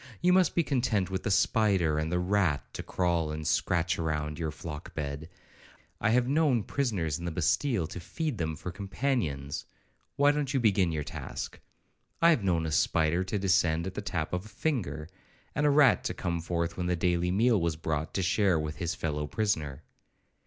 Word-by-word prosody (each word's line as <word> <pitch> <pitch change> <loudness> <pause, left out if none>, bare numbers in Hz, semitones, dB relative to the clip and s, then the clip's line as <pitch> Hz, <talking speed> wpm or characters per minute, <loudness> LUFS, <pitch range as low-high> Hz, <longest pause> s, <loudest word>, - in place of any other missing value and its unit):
You 180 +1 +4
must 185 -1 +3
be 170 - +3
content 115 - 0
with 95 -1 -2
the - - -2
spider 95 -6 +2
and 80 +1 -2
the 90 - +1
rat, 90 -5 +1
to - - -5
crawl 85 -3 0
and 75 0 -5
scratch 85 +4 +1
round 75 -1 -2
your 80 -2 -1
flock 75 +1 -8
bed! 75 +1 -4 0.7
I - - +2
have 120 +2 +3
known 140 -5 +2
prisoners 100 - -1
in 85 - -6
the 85 - -2
Bastile 90 - +1
to 90 - -7
feed 140 - -4
them 80 -1 -1
for 90 - -6
companions,—why 100 - -2
don't 145 -2 -2
you - - +3
begin 100 -6 +3
your 75 -2 -2
task? - - -6 0.6
I 170 0 +6
have 130 -11 +2
known 85 -4 +1
a 80 - -2
spider 80 +4 +2
to 100 +3 -2
descend 85 -4 +2
at 95 - -4
the - - -4
tap 90 -5 -3
of 90 +2 -2
a - - -11
finger, 90 - -2 0.5
and 150 0 +2
a - - +5
rat 145 -2 +5
to - - -2
come 85 -1 -2
forth 85 0 -2
when 90 -1 -2
the 90 - +1
daily 90 +1 +1
meal 110 +2 +3
was 85 -2 0
brought, 80 -1 -2
to 95 - +1
share 100 0 +3
it 80 - +1
with 75 0 -5
his 85 -2 -2
fellow 75 -2 -2
prisoner! 80 -8 -1
90 Hz, 195 wpm, -29 LUFS, 80-110 Hz, 0.7 s, I